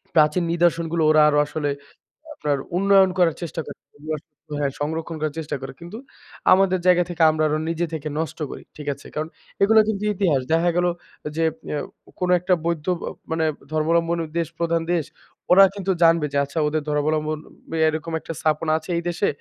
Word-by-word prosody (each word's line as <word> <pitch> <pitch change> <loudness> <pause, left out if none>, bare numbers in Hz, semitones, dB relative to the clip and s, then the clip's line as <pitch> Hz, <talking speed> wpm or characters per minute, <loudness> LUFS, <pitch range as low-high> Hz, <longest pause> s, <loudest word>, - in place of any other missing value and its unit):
প্রাচীন 155 +3 +4
নিদর্শনগুলো, 170 -1 +1
ওরা 155 0 +6
আরো 145 - +2
আসলে 150 0 -3 0.6
আপনার 145 - -1 0.2
উন্নয়ন 195 -1 +5
করার 170 -3 +3
চেষ্টা 165 -1 -4
করে, - - -9 0.2
সং 155 0 -7
হ্যাঁ, 140 -1 0
সংরক্ষণ 160 +2 -3
করার 155 0 -2
চেষ্টা 155 - -4
করে। 135 0 -7
কিন্তু 175 +5 -9 0.6
আমাদের 185 -1 +3
জায়গা 180 -1 +5
থেকে, 170 -1 -4
আমরা 155 0 -1
আরো 155 - +1
নিজে 165 +1 -1
থেকে 155 -1 -4
নষ্ট 160 +1 -4
করি। - - -9
ঠিক 150 - -9
আছে? 140 - -14
কারণ 155 +1 -2 0.3
এগুলা 220 +2 +6
কিন্তু 210 -1 -2
ইতিহাস। 170 -9 +1
দেখা 170 +2 +3
গেল 175 0 +2 0.5
যে, 165 - +2 0.3
অ্যা 150 - -1 0.4
কোনো 180 0 +1
একটা 180 +2 +1
বৈদ্ধ 170 -2 -1 0.2
অ - - -7 0.2
মানে 160 0 +1 0.3
ধর্মাবলম্বন 165 +2 +1 0.2
দেশ, 170 -1 0
প্রধান 170 0 +1
দেশ; 170 -3 +1 0.5
ওরা 195 +2 +9
কিন্তু 195 -1 -1
জানবে 165 -2 +5
যে, - - +1
আচ্ছা, 140 +4 -4
ওদের 155 +1 0
ধর্মাবলম্বন 155 +1 0 0.5
এরকম 160 +1 -2
একটা 165 - -7
স্থাপন 155 +1 0
আছে 160 +3 -10
এই 170 - -2
দেশে, 175 +4 0
165 Hz, 180 wpm, -23 LUFS, 155-175 Hz, 0.6 s, ওরা